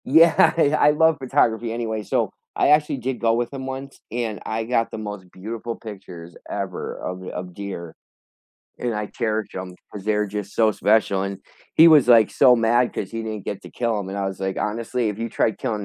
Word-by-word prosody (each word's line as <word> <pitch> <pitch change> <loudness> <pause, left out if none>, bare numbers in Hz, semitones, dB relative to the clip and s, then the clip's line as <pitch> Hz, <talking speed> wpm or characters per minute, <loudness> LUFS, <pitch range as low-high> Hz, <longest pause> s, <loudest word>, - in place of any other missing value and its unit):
Yeah, 160 +4 +6
yeah, 150 +1 +3
I 150 - +6
love 160 +1 +3
photography 115 -3 +1
anyway. 110 -2 -3
So, - - 0 0.2
I - - +3
actually 150 -1 +3
did 130 0 -3
go 115 -1 +2
with 120 +3 -1
him 135 -1 -5
once, 135 +1 -7
and 115 -3 -3
I 110 +1 -2
got 115 -1 0
the - - -5
most 105 -4 -7
beautiful 115 +4 -6
pictures 90 -5 -10
ever - - -4
of 90 0 -6
of 90 0 -6
deer, 85 -4 -7 0.8
and 120 -1 -2
I 105 0 -2
cherished 110 -1 -3
'em 95 -1 -6 0.2
'cause 100 -2 -8
they're 105 0 +1
just 105 0 -6
so 110 -1 +3
special, 105 -2 +2
and 100 0 -4 0.4
he 160 - +8
was, 150 -6 +6
like, 115 -3 +6
so 130 -3 +6
mad 120 +2 +2
'cause 95 - -4
he 115 0 -4
didn't 110 -3 -5
get 100 - -5
to - - -11
kill 115 -3 -1
'em, 100 -2 -5
and 100 +1 -4
I 100 - -1
was 95 0 -5
like, 95 0 -2
"Honestly, 115 +2 -1
if 105 0 -4
you 115 0 -2
tried 110 -1 0
killing 105 -2 -2
110 Hz, 210 wpm, -23 LUFS, 100-120 Hz, 0.8 s, he